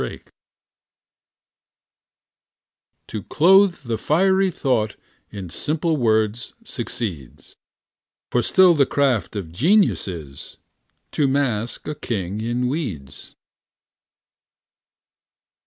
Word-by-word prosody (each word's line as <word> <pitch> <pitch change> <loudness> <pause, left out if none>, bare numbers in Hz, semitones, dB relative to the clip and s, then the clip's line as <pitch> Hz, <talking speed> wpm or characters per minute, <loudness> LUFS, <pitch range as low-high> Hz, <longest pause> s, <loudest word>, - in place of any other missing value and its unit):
POET - - -7 2.8
To 105 - -5
clothe 185 - +4
the 115 -3 -3
fiery 190 +4 +2
thought 120 - -1 0.3
In 95 -5 -8
simple 160 - -1
words 110 -3 0
succeeds, 105 - -6 0.8
For 120 - +2
still 185 +6 +5
the 140 -4 +3
craft 130 -9 0
of 95 -6 -5
genius 180 - +2
is 75 -7 -8 0.5
To 145 - +1
mask 125 -5 -1
a 150 - -2
king 105 -7 -4
in 120 +2 -1
weeds. 105 - -5
120 Hz, 90 wpm, -22 LUFS, 105-155 Hz, 2.8 s, still